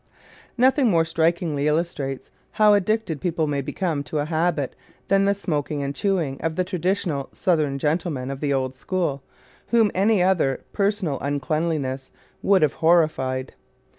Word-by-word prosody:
Nothing 260 +1 +4
more 165 -4 +3
strikingly 160 -3 0
illustrates 150 -4 -2 0.2
how 210 -1 +5
addicted 205 -5 0
people 170 -3 0
may 145 -2 -1
become 160 +1 -2
to 155 - -4
a 145 - 0
habit 160 -3 -1 0.3
than 195 0 +4
the 200 0 +2
smoking 150 -6 -2
and 140 0 -3
chewing 170 -7 -1
of 160 0 -2
the 185 - +1
traditional 180 -5 -2
Southern 155 -7 +1
gentleman 150 -3 -1
of 135 - -6
the 145 -1 -1
old 130 -1 0
school, 150 0 -2 0.5
whom 225 -3 +3
any 200 0 +3
other 175 -8 +1
personal 200 -8 0
uncleanliness 145 -2 -2 0.3
would 195 -4 +4
have 150 - +2
horrified. 155 -6 +2
160 Hz, 145 wpm, -23 LUFS, 140-185 Hz, 0.5 s, how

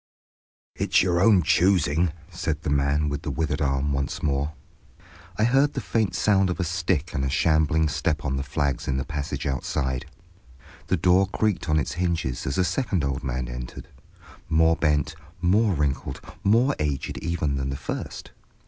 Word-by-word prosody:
"It's - - +3
your 90 -2 +1
own 100 -3 +5
choosing," 85 -1 +3 0.2
said 80 +1 -3
the 75 - -1
man 70 +2 +2
with 70 0 -3
the 80 - -4
withered 75 0 -1
arm 70 0 0
once 70 0 -2
more. 70 +1 0 0.8
I 105 - +2
heard 135 +5 +3
the - - -2
faint 110 -4 -1
sound 95 -3 +3
of 90 - -3
a - - +1
stick 85 -2 -1
and 65 - -1
a 70 - 0
shambling 80 +2 +2
step 75 +1 -1
on 65 -2 0
the 70 - -1
flags 70 -1 -2
in 65 - 0
the 65 - -2
passage 75 -1 -4
outside. 65 0 -2 0.8
The 95 - +1
door 90 +3 +4
creaked 100 -3 -1
on 75 - +3
its 75 -1 0
hinges 85 -8 -2
as 65 - -1
a 95 - +3
second 100 - 0
old 70 +2 -2
man 65 -1 -2
entered, - - -7 0.6
more 80 0 +4
bent, 75 -4 +1 0.3
more 100 +3 +3
wrinkled, 70 -2 -1 0.2
more 120 +7 +3
aged 75 -3 -2
even 80 -5 -1
than 65 0 -2
the 70 - -3
first. - - -6
75 Hz, 175 wpm, -25 LUFS, 70-90 Hz, 0.8 s, own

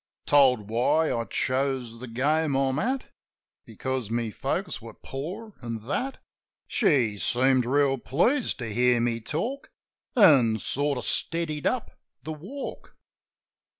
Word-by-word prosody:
Told 130 -7 +4
why 150 +7 +2
I 115 0 -1
chose 130 -3 -1
the 130 - -7
game 145 +5 +1
I'm 135 +1 +1
at 255 +4 -2 0.6
Because 130 -4 -3
my 115 -1 -1
folks - - -3
were - - -10
poor, 185 +11 -7
an' 115 -2 -4
that. 255 - -2 0.5
She 130 - +2
seemed 130 +2 +2
reel 135 0 +2
pleased 230 - +1
to 115 -4 -5
hear 125 +1 +3
me 115 -1 0
talk. 230 - -3 0.5
An' 135 - +6
sort 140 +6 -1
of - - -4
steadied 165 -3 0
up 255 -3 -3 0.2
the 155 - -4
walk. 195 - -8
135 Hz, 130 wpm, -26 LUFS, 120-160 Hz, 0.6 s, An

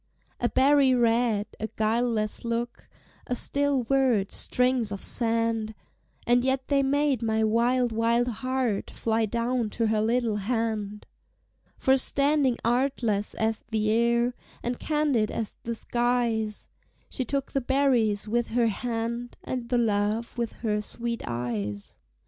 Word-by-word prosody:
A 240 - +1
berry 275 -1 +4
red, 230 -3 +2
a 220 - -2
guileless 220 -1 0
look, 235 +1 -4 0.4
A 245 - -1
still 280 0 +1
word, 245 -6 +2
strings 250 -3 +1
of 200 - -4
sand! 230 -1 0 0.5
And 245 +1 +3
yet 265 0 -1
they 280 -1 +3
made 280 -1 +1
my 220 -1 +1
wild, 240 +3 +2
wild 230 +2 +1
heart 250 -2 -2
Fly 225 -1 0
down 235 +1 -1
to 230 +2 -1
her 215 -1 +1
little 230 -1 +1
hand. 210 -1 -2 0.7
For 265 -1 +3
standing 280 -1 +2
artless 235 -4 0
as 220 0 -1
the 215 -1 0
air, 235 +2 +2 0.3
And 240 0 -3
candid 295 -8 +1
as 220 - -4
the 235 0 -2
skies, 235 -3 -1 0.4
She 260 - -3
took 275 +2 -3
the 275 - 0
berries 245 -6 +1
with 240 +2 0
her 235 0 +2
hand, 235 +2 -3
And 245 -2 -4
the 245 - +2
love 215 0 0
with 235 -1 -2
her 210 -1 +1
sweet 235 +2 -4
eyes. 105 - -4
235 Hz, 135 wpm, -26 LUFS, 220-250 Hz, 0.7 s, berry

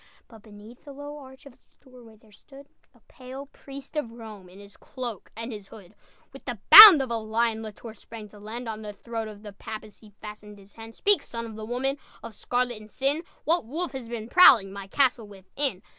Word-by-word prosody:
But 225 -2 -17
beneath 215 +3 -16
the 285 - -12
low 290 +1 -9
arch 265 +1 -15
Of 280 - -14
its - - -33
doorway 250 -4 -18
there 215 0 -24
stood 275 +7 -16 0.3
A - - -25
pale 260 +2 -11
priest 275 0 -13
of 295 -7 -3
Rome, 215 -5 -12
In 185 - -17
his 200 0 -15
cloak 240 -6 -9
and 230 +2 -6
his 205 -2 -10
hood. 200 -2 -15 0.4
With 270 - -14
the 245 -3 -5
bound 405 -10 +12
of 255 - -7
a 230 - -1
lion, 220 0 -2
La 220 - -7
Tour 220 +2 -12
sprang 220 0 -12
to 205 - -16
land, 225 +4 -8
On 220 -1 -6
the 210 -1 -8
throat 225 +2 -6
of 210 -1 -12
the 205 -2 -10
Papist 215 +1 -10
He 215 - -16
fastened 210 -1 -11
his 200 0 -19
hand. 225 0 -12
"Speak, 410 0 +2
son 230 0 -7
of 225 -2 -10
the 215 0 -8
Woman 270 +4 -3 0.2
Of 230 - -9
scarlet 245 -2 -3
and 215 - -15
sin! 275 +7 -2 0.2
What 335 -3 0
wolf 325 +5 -4
has 260 -4 -8
been 225 -2 -6
prowling 230 - +6
My 200 -1 -9
castle 250 -2 0
within?" 200 +3 -6
230 Hz, 220 wpm, -25 LUFS, 215-265 Hz, 0.4 s, bound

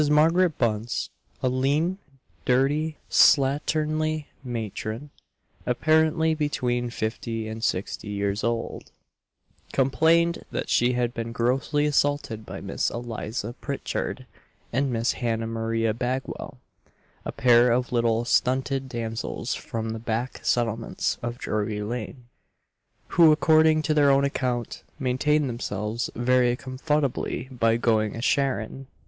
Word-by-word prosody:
Margaret 165 +3 +4
Bunce, 115 0 -1 0.3
a - - +3
lean, 145 +9 +1 0.4
dirty, 145 +5 +1
slatternly 155 +2 +3 0.2
matron, 115 +2 -5 0.6
apparently 160 +5 +3
between 125 -5 -1
fifty 110 0 -3
and 110 +1 -6
sixty 100 0 -2
years 100 0 -1
old, 115 0 -2 0.8
complained 165 +5 +3
that - - -4
she 120 +1 +3
had 120 -1 0
been 115 -1 -4
grossly 130 +5 +1
assaulted 145 -6 0
by 95 +1 -7
Miss 95 0 -1
Eliza 115 -1 -4
Pritchard 140 - -3 0.5
and 135 +2 +1
Miss 115 0 +1
Hannah 115 -2 -2
Maria 115 0 -1
Bagwell 125 +3 -4 0.7
a - - -4
pair 120 -1 +5
of 125 +1 0
little 115 -1 +1
stunted 130 +2 +1
damsels 115 -2 -3
from 110 -1 -4
the 110 - -4
back 115 +3 -3
settlements 115 -1 0
of 120 0 -4
Drury 105 -1 -2
lane; 120 +2 -5 0.8
who, 165 -2 +6
according 155 0 +4
to 155 - +1
their 145 -2 +4
own 140 0 +4
account, 125 -4 -2 0.2
maintain 145 +3 +1
themselves 115 -2 -3
"very 125 0 +2
cumfuttably 135 -1 -2
by 115 -2 +2
going 110 -3 +1
a 115 - -5
charrin." 135 -1 0
125 Hz, 120 wpm, -25 LUFS, 115-145 Hz, 0.8 s, who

